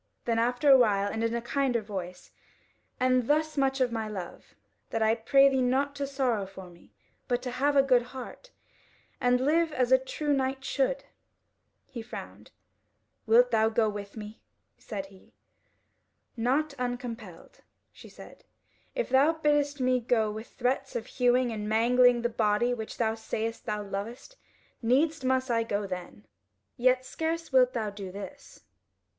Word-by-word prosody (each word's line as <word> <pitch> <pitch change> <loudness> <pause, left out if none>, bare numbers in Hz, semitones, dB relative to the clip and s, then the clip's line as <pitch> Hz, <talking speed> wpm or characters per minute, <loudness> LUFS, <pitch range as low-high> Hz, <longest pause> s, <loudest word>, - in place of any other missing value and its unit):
Then 230 -1 +1
after 245 +4 0
a 265 - +9
while, 205 -4 +2
and 220 +1 -3
in 230 +1 0
a 235 - -3
kinder 245 -2 0
voice: 185 -3 -7 0.7
"And 255 -1 +2
thus 310 +1 +1
much 270 -1 +1
of 255 -2 +2
my 225 -1 -3
love, 190 -5 -8 0.3
that 225 -1 -1
I 220 0 +4
pray 275 +5 +4
thee 265 -1 +2
not 270 +3 +1
to 280 -1 -2
sorrow 255 -7 -1
for 190 -2 -11
me, 170 - -21 0.3
but 245 0 -1
to 250 - -4
have 280 +4 +1
a 275 - +6
good 255 -3 +4
heart, 255 - -10 0.7
and 250 0 +3
live 315 +5 +2
as 255 -4 0
a 260 - +7
true 290 +3 -2
knight 265 0 -1
should." - - 0 0.8
He 250 -4 -8
frowned: 225 - -9 0.8
"Wilt - - +5
thou 220 0 +3
not 220 - -4
go 220 -2 +3
with 205 0 -7
me?" 215 0 -9 0.3
said 200 -4 -6
he. 195 -1 -19 1.0
"Not 270 +6 0
uncompelled," 240 -7 -6 0.3
she - - -14
said: - - -14 0.5
"if - - -1
thou 275 +5 +4
biddest 295 -2 +1
me 255 0 +2
go 225 -3 +1
with 220 +2 -7
threats 265 +2 -2
of 230 -2 -3
hewing 250 -1 +2
and 210 -1 -4
mangling 240 +2 +4
the - - +3
body 225 +1 +1
which 220 -3 -6
thou 220 -2 +1
sayest 225 0 -4
thou 210 0 -2
lovest, 210 - -6 0.5
needs 280 +5 +2
must 260 0 +1
I 230 -1 +2
go 205 -2 -2
then. 180 - -7 0.5
Yet 255 +1 +2
scarce 325 +3 -3
wilt 255 -1 +5
thou 220 -4 -2
do 200 -2 -8
this." 205 +9 -10
245 Hz, 165 wpm, -28 LUFS, 220-270 Hz, 1.0 s, a